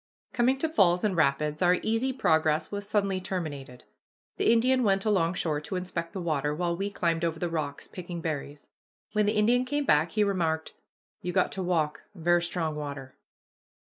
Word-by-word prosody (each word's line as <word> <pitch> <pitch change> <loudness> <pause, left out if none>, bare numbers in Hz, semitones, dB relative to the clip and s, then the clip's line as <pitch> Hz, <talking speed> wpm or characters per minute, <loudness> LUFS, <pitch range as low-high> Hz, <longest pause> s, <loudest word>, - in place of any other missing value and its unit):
Coming 255 +2 +2
to 320 - 0
falls 180 - +3
and 205 -3 +1
rapids, 150 0 +1
our 180 0 +5
easy 225 +4 +1
progress 160 - +1
was 205 0 -5
suddenly 200 -3 +1
terminated. 145 -9 -5 0.5
The - - +3
Indian 255 +3 +3
went 195 -3 +2
alongshore 165 -6 +1
to - - -4
inspect 180 -2 -4
the 195 - -4
water, 150 -3 -1
while 170 +1 -1
we 195 +3 -2
climbed 170 -4 -1
over 165 -1 0
the 175 0 -3
rocks, 150 -3 -3
picking 175 -1 -7
berries. 145 -3 -5 0.5
When 210 -1 +2
the 210 +1 +1
Indian 240 +4 +3
came 290 +2 -1
back, 155 - +3
he 215 - +3
remarked, 165 -5 -1 0.5
"You 180 - -3
got 185 - +2
to 190 - -4
walk; 165 -4 0
ver' 175 0 +2
strong 170 -2 -2
water." 140 -3 -6
175 Hz, 175 wpm, -28 LUFS, 155-205 Hz, 0.5 s, our